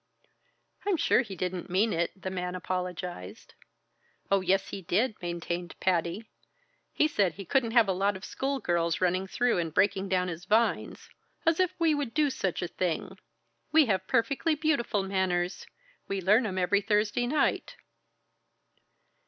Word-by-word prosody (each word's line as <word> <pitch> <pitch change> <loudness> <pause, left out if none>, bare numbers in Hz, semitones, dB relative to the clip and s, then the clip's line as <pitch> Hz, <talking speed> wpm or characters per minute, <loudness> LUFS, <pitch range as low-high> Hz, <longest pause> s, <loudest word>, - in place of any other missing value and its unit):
"I'm 390 -4 +2
sure 270 - +3
he 205 -6 -7
didn't 180 +1 -4
mean 205 +5 +2
it," 170 +3 -2
the 190 0 -5
man 180 -1 -3
apologized. 180 - -5 0.8
"Oh, 195 -1 +4
yes, 190 +1 +1
he 195 - -6
did!" 210 +7 0
maintained 175 0 -4
Patty. 180 +4 0 0.6
"He 305 - +3
said 200 - +1
he 195 +2 -9
couldn't 245 +3 +1
have 235 -3 +5
a - - +2
lot 195 +1 0
of 190 - -10
school 275 0 -2
girls 170 -4 0
running 185 +1 +1
through 245 0 +1
and 165 -2 -2
breaking 195 +3 +1
down 185 -1 +1
his 175 0 -6
vines 220 +4 +1 0.4
as 330 +1 +3
if 370 -1 +1
we 330 -2 +3
would 285 -4 -3
do 300 -2 +3
such 190 -8 -2
a - - -1
thing! 185 +2 -3 0.5
We 315 -1 +6
have 190 -5 0
perfectly 280 +7 +1
beautiful 285 -10 0
manners. 190 -2 -1 0.4
We 195 0 -2
learn 210 +6 +3
'em 190 -2 -4
every 185 +2 +2
Thursday 210 +3 +1
night." 290 +2 0
195 Hz, 160 wpm, -29 LUFS, 180-235 Hz, 0.8 s, We